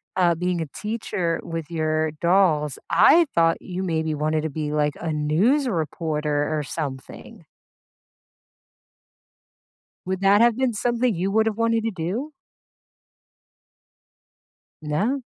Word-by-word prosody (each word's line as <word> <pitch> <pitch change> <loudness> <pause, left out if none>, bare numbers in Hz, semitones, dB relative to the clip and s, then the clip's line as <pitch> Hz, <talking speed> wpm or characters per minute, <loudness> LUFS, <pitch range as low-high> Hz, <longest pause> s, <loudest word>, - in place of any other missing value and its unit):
uh, 175 -2 +3
being 180 +1 -2
a - - -2
teacher 205 -6 -2
with 165 -2 -5
your 155 -1 0
dolls, 155 -3 +1
I 340 0 +6
thought 165 0 +3
you 185 +1 -5
maybe 160 -3 -1
wanted 155 +1 0
to 160 - -2
be, 150 0 -4
like, 150 -1 +1
a 165 - -3
news 185 - +2
reporter 155 -5 -1
or 150 - -2
something. 140 -3 -7 2.6
Would 190 0 -2
that 200 +2 +5
have 235 -1 +4
been 260 -2 +1
something 240 +1 0
you 185 +3 -1
would 220 +1 +3
have 220 - -1
wanted 230 -1 +1
to 225 - 0
do? 200 - -4 2.5
No? 205 - -1
170 Hz, 125 wpm, -23 LUFS, 155-215 Hz, 2.6 s, I